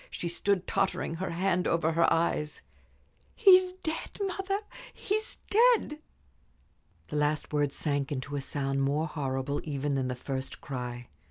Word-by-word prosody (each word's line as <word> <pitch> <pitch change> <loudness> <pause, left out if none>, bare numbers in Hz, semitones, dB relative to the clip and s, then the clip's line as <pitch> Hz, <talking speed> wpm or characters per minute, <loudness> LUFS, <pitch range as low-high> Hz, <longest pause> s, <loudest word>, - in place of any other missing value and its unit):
She 175 - -4
stood 190 +2 +1
tottering, 190 -4 0
her 190 - -3
hand 180 +1 +1
over 165 -1 +2
her 165 +1 +3
eyes. 165 -2 0 0.7
"He's 370 -4 +6
dead, 325 -3 -4
mother! 390 0 -1 0.3
He's 430 +2 -2
dead!" 445 -9 +4 1.1
The 150 - -2
last 150 0 0
word 145 -1 +2
sank 145 -1 -1
into 140 +1 -3
a 140 - -1
sound 135 0 -1
more 145 +3 +1
horrible 140 -2 -2
even 145 -1 -2
than 135 -2 0
the 125 - -2
first 130 +1 -5
cry. 125 -4 -5
155 Hz, 145 wpm, -29 LUFS, 140-200 Hz, 1.1 s, He's